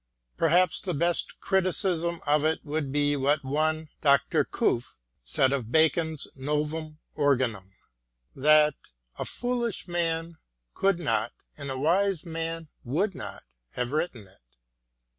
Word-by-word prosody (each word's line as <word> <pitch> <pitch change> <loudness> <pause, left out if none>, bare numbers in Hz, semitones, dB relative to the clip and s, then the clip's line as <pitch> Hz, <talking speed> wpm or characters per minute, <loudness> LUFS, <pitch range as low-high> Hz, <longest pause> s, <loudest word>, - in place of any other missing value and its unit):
Perhaps 180 - +3
the 180 - -2
btst 170 +3 0
criti 190 -2 +1
cism 170 -3 0
of 150 0 +3
it 160 +1 0
would 145 -2 -2
be 145 0 +2
what 140 +1 +1
one 155 +3 0
Dr. 140 -2 +3
Cuffe 120 +2 -1 0.3
said 130 - +2
of 120 -5 -3
Bacon's 160 0 +2
Novum 150 +3 -2 0.2
Organum, 125 -10 0 0.6
that 150 +2 +5 0.3
" - - -29
a - - -2
foolish 240 -5 -2
man 165 -1 -1 0.3
could 195 -2 +2
not, 120 -9 0 0.2
and 140 -1 -7
a 135 - -3
wise 180 +5 +1
man 165 0 -4 0.2
would 180 - 0
not, - - -8 0.3
have 125 0 -2
written 150 - -2
it." 95 +1 -22
155 Hz, 135 wpm, -27 LUFS, 140-170 Hz, 0.6 s, that